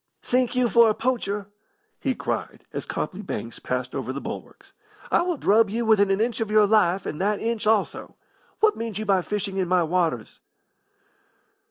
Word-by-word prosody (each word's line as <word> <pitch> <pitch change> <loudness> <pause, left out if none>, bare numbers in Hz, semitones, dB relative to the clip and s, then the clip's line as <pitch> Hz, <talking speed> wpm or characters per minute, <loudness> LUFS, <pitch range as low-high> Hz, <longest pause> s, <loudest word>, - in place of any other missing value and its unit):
"Sink 250 0 +1
you 250 -1 +3
for 235 -1 +5
a 215 - +1
poacher!" 210 -5 -1 0.5
he 265 -3 -1
cried, - - -4
as - - -5
Copley - - -4
Banks - - -5
passed - - -3
over - - -3
the - - -4
bulwarks. - - -9 0.4
"I - - +4
will 350 -2 -1
drub 220 -2 +3
you 230 +3 -2
within 205 -3 +4
an 195 +1 +1
inch 230 +1 0
of 220 - -1
your 215 0 +5
life, 195 -3 +2
and 155 - -4
that 205 +1 +1
inch 225 -1 -2
also! 215 -2 0 0.5
What 430 -1 +4
mean 230 -2 -5
you 215 +2 -3
by 195 -3 +3
fishing 200 0 -3
in 185 -2 0
my 180 0 +3
waters?" 165 -8 -1
215 Hz, 185 wpm, -24 LUFS, 195-230 Hz, 0.5 s, for